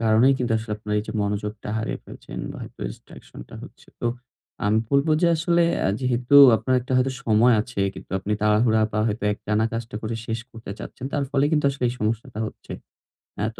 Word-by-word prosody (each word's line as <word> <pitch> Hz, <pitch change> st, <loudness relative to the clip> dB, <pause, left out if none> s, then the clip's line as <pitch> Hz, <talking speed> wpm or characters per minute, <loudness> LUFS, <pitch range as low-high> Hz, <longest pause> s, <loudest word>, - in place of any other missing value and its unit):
কারনেই 115 Hz, +4 st, +4 dB
কিন্তু 120 Hz, -2 st, -1 dB
আসলে 110 Hz, -1 st, -5 dB
আপনার 105 Hz, 0 st, -6 dB
এই -, -, -1 dB
যে 110 Hz, -, -5 dB
মনোযোগটা 105 Hz, +1 st, -3 dB
হারিয়ে 110 Hz, -, -3 dB
ফেলছেন, -, -, -10 dB, 0.2 s
হয়তো -, -, -10 dB
distraction -, -, -13 dB
টা -, -, -12 dB
হচ্ছে। -, -, -14 dB
তো 120 Hz, -, -1 dB, 0.6 s
আমি 105 Hz, +2 st, +3 dB
বলব 140 Hz, +3 st, +3 dB
যে -, -, +5 dB
আসলে 170 Hz, +1 st, +2 dB, 0.2 s
এ -, -, +2 dB
যেহেতু 125 Hz, +1 st, 0 dB, 0.2 s
আপনার 130 Hz, +3 st, 0 dB
একটা 130 Hz, +1 st, -6 dB
হয়তো 130 Hz, +1 st, +2 dB
সময় 115 Hz, +2 st, +5 dB
আছে। 110 Hz, -2 st, -5 dB
কিন্তু -, -, -11 dB
আপনি 100 Hz, +3 st, -3 dB
তাড়াহুড়া 110 Hz, +1 st, +3 dB
বা 105 Hz, -, -1 dB
হয়তো 105 Hz, -1 st, -2 dB
একটানা 105 Hz, +1 st, -1 dB
কাজটা 115 Hz, -1 st, -5 dB, 0.3 s
শেষ 115 Hz, 0 st, -2 dB
করতে 115 Hz, -4 st, -10 dB
চাচ্ছেন। 125 Hz, -, -8 dB
তার 145 Hz, -2 st, 0 dB
ফলে 140 Hz, 0 st, +2 dB
কিন্তু 150 Hz, -2 st, +2 dB
আসলে 135 Hz, -2 st, -4 dB
এই 120 Hz, -, -3 dB
সমস্যাটা 110 Hz, +2 st, -2 dB
হচ্ছে। -, -, -10 dB, 0.7 s
অ্যা 105 Hz, -, -1 dB
তো -, -, -13 dB
115 Hz, 195 wpm, -24 LUFS, 105-130 Hz, 0.7 s, যে